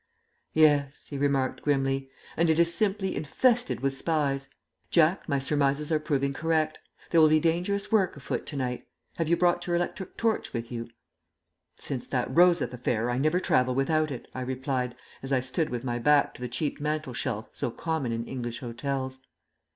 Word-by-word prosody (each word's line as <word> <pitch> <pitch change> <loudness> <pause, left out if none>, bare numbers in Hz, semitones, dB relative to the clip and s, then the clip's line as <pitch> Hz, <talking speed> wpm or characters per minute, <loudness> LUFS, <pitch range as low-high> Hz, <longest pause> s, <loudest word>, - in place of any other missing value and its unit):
"Yes," 145 -3 +3
he 140 - -3
remarked, 135 -2 +1
grimly; 135 -2 0 0.3
"and 165 +1 +2
it 160 +1 +3
is 170 0 +4
simply 195 0 0
infested 240 - +1
with 135 0 0
spies. 140 -3 -1 0.4
Jack, 170 +3 +3
my 140 - +2
surmises 140 +2 0
are 155 - +3
proving 140 -3 0
correct. 155 +1 0 0.3
There 165 - +6
will 155 - +8
be 155 0 +5
dangerous 180 +6 0
work 195 -8 +2
afoot 140 - -4
to - - -6
night. 125 -2 -3 0.3
Have 165 - 0
you 170 - +4
brought 175 0 +2
your 175 - +1
electric 175 +2 -3
torch 225 -1 0
with 115 -1 -4
you?" 115 -1 -5 0.9
"Since 130 -4 -4
that 125 0 -1
Rosyth 175 -6 +5
affair, 120 -1 -1
I 120 - 0
never 155 +5 +2
travel 125 -7 +2
without 155 +3 +2
it," 130 -4 -6
I 130 - -4
replied, 130 -1 -2 0.3
as 135 - -6
I 135 - +4
stood 130 +5 -1
with 120 0 -4
my 120 -2 -2
back 145 +3 +4
to - - -13
the 125 - -3
cheap 140 +5 -2
mantel 150 -3 -2
shelf 115 -3 -3
so - - -2
common 155 -1 -2
in 115 0 -2
English 120 -3 -5
hotels. 130 +2 -3
140 Hz, 180 wpm, -28 LUFS, 130-160 Hz, 0.9 s, will